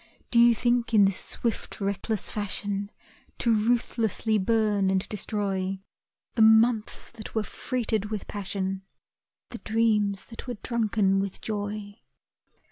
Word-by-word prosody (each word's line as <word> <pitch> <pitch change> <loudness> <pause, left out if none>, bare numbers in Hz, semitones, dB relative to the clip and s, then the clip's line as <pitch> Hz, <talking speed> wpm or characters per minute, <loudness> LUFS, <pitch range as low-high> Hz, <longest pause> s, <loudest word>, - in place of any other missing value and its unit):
Do 235 - +4
you 235 0 +7
think 240 -1 +1
in 205 -2 +7
this 195 -1 +1
swift 230 -2 -3
reckless 200 +1 -1
fashion 205 -1 -2 0.5
To 235 - +2
ruthlessly 220 -1 +1
burn 205 -1 +2
and 190 0 +1
destroy 195 -2 -2 0.5
The 230 - +1
months 220 0 +4
that 230 -1 -10
were 220 - +1
freighted 225 -2 -2
with 210 -1 -4
passion, 195 -1 -3 0.7
The 235 - -7
dreams 215 -3 +1
that 230 +2 -10
were 245 - -3
drunken 215 -5 +1
with 195 -1 -3
joy? 205 0 -5
215 Hz, 125 wpm, -27 LUFS, 200-230 Hz, 0.7 s, you